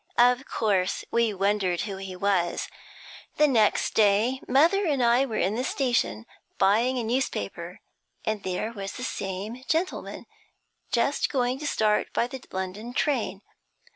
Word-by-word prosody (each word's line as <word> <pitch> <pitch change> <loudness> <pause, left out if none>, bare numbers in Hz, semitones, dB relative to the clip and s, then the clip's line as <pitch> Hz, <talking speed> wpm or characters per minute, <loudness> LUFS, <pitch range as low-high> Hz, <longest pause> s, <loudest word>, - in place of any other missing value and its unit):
Of 245 +2 +4
course, 195 -4 0
we 235 -1 +2
wondered 195 -2 0
who 200 -3 -4
he 190 -1 -7
was. 180 -2 0 0.7
The 300 - +5
next 225 -6 +2
day 220 +5 +3
mother 330 +10 +4
and 280 -5 +1
I 240 +3 +4
were 220 -3 -3
in 195 - +1
the 245 +3 -1
station, 245 - 0 0.3
buying 225 +7 +3
a 240 - -1
newspaper, 180 - -3 0.4
and 215 -1 -1
there 190 +5 -3
was 195 -2 -6
the 250 - -7
same 205 +2 -4
gentleman, 335 +3 -2 0.7
just 260 +4 +1
going 255 -1 0
to 295 - -4
start 215 -5 +1
by - - +2
the 255 +1 -8
London 195 +6 -5
train. 225 -9 0
225 Hz, 145 wpm, -26 LUFS, 195-255 Hz, 0.7 s, The